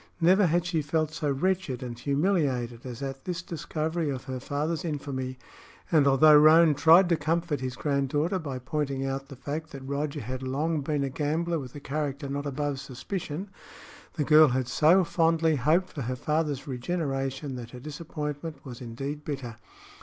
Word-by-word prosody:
Never 185 +3 +5
had 170 +2 +1
she 170 -3 0
felt 155 +1 0
so 155 -2 -2
wretched 145 -2 -1
and 120 -1 -5
humiliated 140 -6 0
as 125 +1 -6
at 135 -1 -5
this 180 -1 -3
discovery 160 -1 -2
of 130 -3 -4
her 130 -1 -5
father's 150 +6 -2
infamy, 135 -5 -4 0.5
and 150 -4 +5
although 150 +3 +7
Roane 155 +1 +7
tried 165 +6 +6
to 170 - +4
comfort 160 0 -1
his 130 0 -4
granddaughter 145 +6 0
by 140 -6 -5
pointing 135 +1 -2
out 135 0 -3
the 140 - -10
fact 150 +4 -5
that 135 -4 -9
Roger 140 +1 -2
had 130 +3 -5
long 145 +4 -1
been 145 0 -1
a 135 - -1
gambler 160 +4 -1
with 130 -2 -9
a - - -6
character 145 0 -3
not 140 +1 -3
above 145 0 -2
suspicion, 150 +7 -5 0.6
the 155 - -1
girl 155 +1 +7
had 130 -1 0
so 160 +8 +5
fondly 165 -2 +2
hoped 160 +8 +2
for 145 - -4
her 125 +1 -2
father's 150 0 -1
regeneration 135 0 -2
that 120 -2 -7
her 125 - -10
disappointment 150 0 -6
was 125 -2 -8
indeed 135 +5 -5
bitter. 135 -6 -5
145 Hz, 175 wpm, -27 LUFS, 135-160 Hz, 0.6 s, although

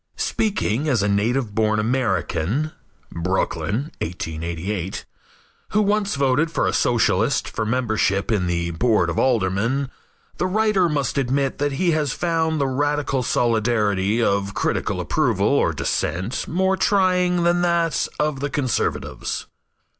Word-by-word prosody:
Speaking 155 - 0
as 120 -8 +2
a - - +1
native 105 +3 0
born 110 0 +1
American 110 - 0 0.4
(Brooklyn 105 - -1
1888) 85 +3 -4 0.7
who 210 - +4
once 205 -3 +1
voted 140 +3 +2
for 165 - 0
a - - 0
Socialist - - +2
for 110 - -3
membership 110 -4 0
in 95 -5 +1
the 85 -1 -1
Board 90 -2 +2
of 85 - -2
Aldermen, 120 +3 +1 0.5
the 180 - 0
writer 200 -2 +2
must 140 -2 -1
admit 135 +1 0
that 145 0 0
he 170 +5 +1
has 150 -4 0
found 160 -2 0
the 140 - +2
radical 145 0 0
solidarity 110 -3 +1
of 100 -1 0
critical - - -1
approval - - +1
or - - +2
dissent 90 +10 -2
more 190 +3 +1
trying 180 -3 +2
than 175 +1 +2
that 170 -2 +1
of 150 -2 0
the 145 +1 -2
conservatives. 135 -4 -2
130 Hz, 130 wpm, -22 LUFS, 100-155 Hz, 0.7 s, who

